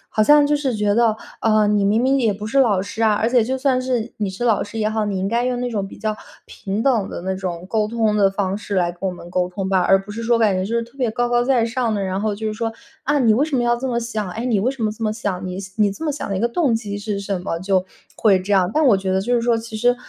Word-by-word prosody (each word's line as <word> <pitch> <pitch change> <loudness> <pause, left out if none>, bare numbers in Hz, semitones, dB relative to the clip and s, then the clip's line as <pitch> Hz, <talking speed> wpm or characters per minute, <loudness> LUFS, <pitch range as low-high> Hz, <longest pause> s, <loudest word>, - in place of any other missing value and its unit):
好 215 - +3
像 295 +5 +6
就 295 +1 +2
是 270 -5 -1
觉 210 -1 +1
得， 225 -1 +2 0.2
啊， 215 -1 +3
你 205 -1 +2
明 205 +3 +3
明 270 +2 +2
也 225 -4 +2
不 205 +1 -6
是 230 +6 +1
老 215 -8 +3
师 205 +3 -6
啊， 220 -1 +4
而 220 +2 +1
且 240 -1 +3
就 260 +3 -2
算 260 -1 +1
是， 245 -3 -2
你 205 -3 -1
是 190 +6 -4
老 225 -4 +2
师 205 +2 -8
也 215 -1 +1
好， 215 -1 -1
你 200 -2 -2
应 190 - -1
该 235 +3 0
用 250 -1 -1
那 245 - -2
种 200 -3 -2
比 - - -12
较 215 -1 -2 0.3
平 200 +3 -4
等 240 -8 +2
的 - - -6
那 190 +1 -2
种 180 -2 -5
沟 215 0 0
通 220 -2 0
的 200 -2 +4
方 195 -1 -2
式， 205 -1 -5
来 175 -2 +1
跟 190 +2 -3
我 - - -4
们 175 -1 -10
沟 180 -1 0
通 190 +1 -4
吧， 190 -1 +2
而 195 +1 +4
不 200 +2 -9
是 230 - -5
说 235 0 +2
感 215 -4 +3
觉 185 - -1
就 220 +5 -2
是 235 - +1
特 235 +3 -17
别 245 - +1
高 240 +2 -1
高 240 0 +2
在 245 -3 +2
上 230 -1 -1
的。 205 - -2
然 190 +1 -2
后 215 -1 -1
就 220 - -6
是 215 - -1
说： 225 +1 -2 0.3
“啊， 295 +1 +1
你 230 -5 +4
为 255 +7 +2
什 305 -3 -1
么 245 - +1
要 240 0 +2
这 260 +2 -4
么 235 -1 0
想？ 215 -5 -4
哎， 225 +6 -5
你 230 -5 +1
为 225 +6 +1
什 265 -4 -5
么 215 - +1
这 225 +1 -7
么 215 - +1
想？ 190 -4 -3
你 180 - -5 0.2
你 210 -2 +3
这 320 +11 -6
么 300 - +1
想 285 - -5
的 195 - -1
一 - - -2
个 235 - +2
动 265 -2 +1
机 210 -3 -4
是 205 -1 -3
什 195 -2 -3
么？ 165 - -3
“就 185 0 +1 0.3
会 200 -4 +3
这 200 +2 -2
样， 185 -2 +3
但 310 -1 +3
我 240 - +6
觉 190 -1 -2
得 190 - +2
就 235 +6 -1
是 235 - +2
说， 235 -1 +2
其 225 -1 -7
实 245 +3 +2
215 Hz, 345 characters per minute, -21 LUFS, 195-240 Hz, 0.3 s, 像